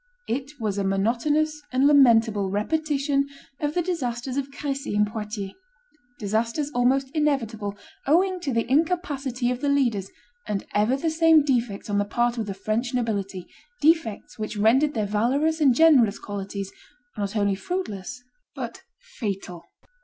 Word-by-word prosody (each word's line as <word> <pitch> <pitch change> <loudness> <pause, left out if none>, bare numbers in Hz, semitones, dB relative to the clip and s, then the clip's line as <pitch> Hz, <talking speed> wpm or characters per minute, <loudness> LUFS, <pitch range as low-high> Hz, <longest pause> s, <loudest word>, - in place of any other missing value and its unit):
It 275 +4 -4
was 205 -3 -1
a - - 0
monotonous 250 +11 +1
and 260 +2 +2
lamentable 225 -8 +5
repetition 280 +5 0 0.3
of 295 0 -2
the 350 - +1
disasters 255 -7 -3
of 280 0 -2
Crecy 275 -5 -4
and 210 0 +4
Poitiers; 210 -2 -5 0.6
disasters 230 +8 -1
almost 265 +1 +1
inevitable, 230 -9 -1 0.3
owing 365 +5 +3
to 295 -6 -3
the 230 -1 0
incapacity 275 -4 0
of 250 - -4
the 285 - +1
leaders 240 -9 +1 0.4
and 200 -2 -2
ever 215 +6 +2
the 320 +3 -1
same 320 -1 +5
defects 240 -7 -1
on 205 -1 0
the 205 - +1
part 240 +3 0
of 220 - -2
the 195 - -4
French 220 +5 -2
nobility, 200 -6 -2 0.3
defects 300 -11 +1
which 215 0 -4
rendered 255 +8 +3
their 215 -2 0
valorous 270 +10 +1
and 270 -5 +5
generous 255 -9 +5
qualities 200 -1 -5 0.4
not 200 0 -3
only 205 -2 +2
fruitless, 245 - -5 0.3
but - - -6 0.4
fatal. 195 -6 -4
245 Hz, 145 wpm, -25 LUFS, 210-285 Hz, 0.6 s, lamentable